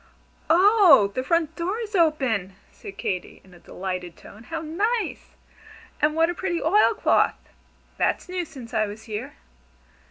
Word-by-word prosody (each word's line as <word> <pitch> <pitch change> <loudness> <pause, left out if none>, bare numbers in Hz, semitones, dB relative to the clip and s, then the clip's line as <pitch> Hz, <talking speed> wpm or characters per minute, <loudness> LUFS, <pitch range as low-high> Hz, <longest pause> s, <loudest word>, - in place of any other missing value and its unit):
"Oh, 350 - +6
the 255 - -2
front 325 +2 0
door 360 +5 -2
is 440 -2 -6
open!" 265 - +1 0.2
said 195 - -11
Katy, 185 -2 -4
in 185 - -19
a 175 - -16
delighted 180 -1 -6
tone. 215 +3 -14
"How 325 - -4
nice! 405 +9 -2 0.7
And 300 +1 +2
what 325 0 +3
a - - -4
pretty 345 -1 -2
oil 415 +7 +3
cloth. - - +2 0.6
That's - - 0
new 365 0 -3
since 265 -8 -12
I 215 -1 +1
was 210 +2 -9
here." 215 -1 -6
315 Hz, 155 wpm, -24 LUFS, -, 0.7 s, Oh